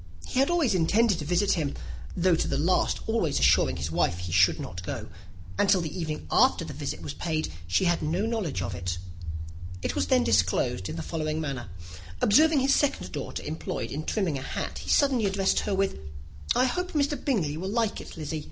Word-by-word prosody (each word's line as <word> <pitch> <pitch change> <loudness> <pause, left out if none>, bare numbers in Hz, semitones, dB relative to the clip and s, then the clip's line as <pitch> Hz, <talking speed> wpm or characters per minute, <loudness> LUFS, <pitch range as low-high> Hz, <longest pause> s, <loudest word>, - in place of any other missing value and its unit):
He - - -1
had 275 - +4
always 330 - +2
intended 190 +3 +3
to 150 - -4
visit 180 +5 +2
him, 155 -7 0 0.4
though 180 0 +4
to - - -1
the 140 - -1
last 170 +6 +1
always 220 -10 +1
assuring - - +4
his 75 +3 -3
wife 85 +1 +2
that 90 - -7
he 85 - -5
should 90 +1 +4
not 90 0 -6
go; - - -5 0.5
and 200 - +3
till 195 -1 +5
the 160 -2 -5
evening 155 -4 -4
after - - +4
the - - -7
visit - - -5
was 140 - -5
paid 155 - -2 0.2
she 90 - +2
had 175 -1 +2
no 170 +7 0
knowledge 200 - -2
of 95 +1 -3
it. 90 0 -3 0.9
It - - -1
was - - 0
then 255 -2 +4
disclosed 100 +2 +1
in - - -4
the 165 - -4
following 155 -1 -2
manner. 135 - -4 0.5
Observing 300 +6 +5
his 275 +1 +3
second 290 - +1
daughter - - -5
employed 150 -6 -4
in 150 +3 -3
trimming 170 -7 -1
a - - -7
hat, 135 - -4
he - - -8
suddenly 260 -7 +3
addressed 195 0 +1
her 205 - -1
with, 195 - 0 0.6
"I 255 - +4
hope 360 +8 -2
Mr. 290 -1 +1
Bingley 180 - 0
will 185 +4 -4
like 225 0 0
it, - - -11
Lizzy." 155 0 -3
170 Hz, 210 wpm, -27 LUFS, 140-220 Hz, 0.9 s, till